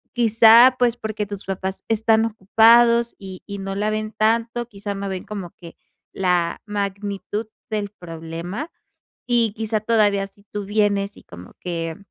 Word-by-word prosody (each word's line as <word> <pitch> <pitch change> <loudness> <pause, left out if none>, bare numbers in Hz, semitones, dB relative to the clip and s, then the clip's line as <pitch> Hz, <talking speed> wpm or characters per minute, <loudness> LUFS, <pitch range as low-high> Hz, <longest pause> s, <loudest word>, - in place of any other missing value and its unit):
quizá, 230 +2 +7
pues, 245 -2 +2
porque 215 -2 -4
tus 200 -1 -7
papás 190 0 -4
están 225 0 +2
ocupados 230 +3 +4
y 190 -2 -10
y 200 -1 -6
no 195 0 -4
la 210 +2 0
ven 215 0 -3
tanto, 230 +2 0
quizá 205 -2 -6
no 195 0 -4
ven 190 -1 -4
como 195 -5 -6
que 170 -2 -12 0.4
la 180 -3 0
magnitud 205 +1 -4 0.2
del 210 -2 -2
problema, 170 - -7 0.6
y 235 -4 +1
quizá 220 0 -1
todavía 210 -3 +2
si 200 +1 -22
tú 205 -1 -4
vienes 205 -1 0
y - - -15
como 90 +1 -13
que 165 -2 -4
205 Hz, 155 wpm, -22 LUFS, 195-225 Hz, 0.6 s, quizá